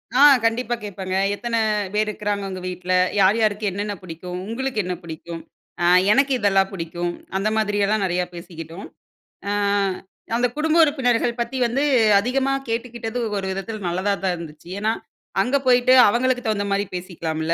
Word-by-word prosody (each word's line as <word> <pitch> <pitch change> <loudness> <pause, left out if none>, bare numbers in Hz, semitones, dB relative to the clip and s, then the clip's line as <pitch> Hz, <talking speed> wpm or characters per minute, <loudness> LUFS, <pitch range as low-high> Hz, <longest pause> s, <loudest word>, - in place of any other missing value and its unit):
ஆ 270 - +5 0.2
கண்டிப்பா 240 +1 0
கேப்பாங்க, 190 -2 -4 0.2
"எத்தனை 230 +1 -2 0.3
பேர் 215 +1 +1
இருக்குறாங்க 205 -1 -2
உங்க 185 -1 -5
வீட்ல? 180 0 -3 0.3
யார் 195 +3 +5
யாருக்கு 215 -1 +1
என்னென்ன 205 +2 -3
புடிக்கும்? 180 +1 -7
உங்களுக்கு 260 0 -2
என்ன 180 0 -3
பிடிக்கும்?" 165 +1 -7 0.4
"அ - - +3 0.3
எனக்கு 275 +4 +3
இதெல்லாம் 195 -2 +3
புடிக்கும்" 175 0 -3 0.2
அந்தமாதிரியெல்லாம் 210 0 +1
நிறையா 180 0 0
பேசிக்கிட்டோம். 170 +1 -9 0.6
அ - - 0 0.8
அந்த 245 +1 +2
குடும்ப 315 +2 +2
உறுப்பினர்கள் 245 -5 +1
பத்தி 260 +3 -2
வந்து 270 +5 0 0.4
அதிகமா 265 +5 0 0.2
கேட்டுக்கிட்டது 230 0 -3 0.2
ஒரு 195 - -3
விதத்தில 205 +3 -5
நல்லதா 185 +4 0
தான் 185 -2 +1
இருந்துச்சு, 160 0 -10
ஏன்னா 215 +2 +1 0.5
அங்க 250 +7 +2
போயிட்டு 250 0 +5 0.2
அவங்களுக்கு 250 +2 +1
தகுந்த 210 -2 0
மாரி 200 +1 +1
பேசிக்கலாம்ல. 165 -3 -3
205 Hz, 145 wpm, -22 LUFS, 180-235 Hz, 0.8 s, ஆ